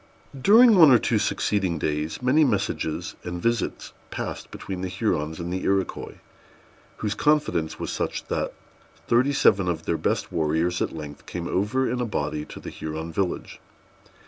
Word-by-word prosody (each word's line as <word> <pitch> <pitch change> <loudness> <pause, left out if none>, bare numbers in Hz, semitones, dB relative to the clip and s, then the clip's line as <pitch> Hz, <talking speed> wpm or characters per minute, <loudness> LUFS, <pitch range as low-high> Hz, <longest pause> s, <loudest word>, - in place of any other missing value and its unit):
During 225 - +7
one 165 -5 +8
or 125 - +8
two 115 -1 +1
succeeding 95 -5 0
days, 75 +7 -2
many 140 +5 +4
messages 95 - -1
and 90 0 -5
visits 115 +5 -1 0.2
passed - - -5
between 95 -2 -6
the 95 - -2
Hurons 90 -5 -1
and 85 +1 -4
the 95 - -2
Iroquois, 95 -1 -1 0.8
whose 105 -1 -2
confidence 150 - +1
was - - -3
such, - - -3
that - - -2 0.6
thirty 125 +4 +3
seven 100 -8 +3
of 85 -2 -2
their 85 - 0
best - - -1
warriors 80 +2 0
at - - 0
length 75 -2 -9
came 85 -1 -4
over 110 +10 0
in 125 +1 -1
a - - 0
body 75 -7 -2
to - - -10
the - - -8
Huron 80 +1 -6
village. 95 +1 -2
95 Hz, 165 wpm, -25 LUFS, 80-120 Hz, 0.8 s, one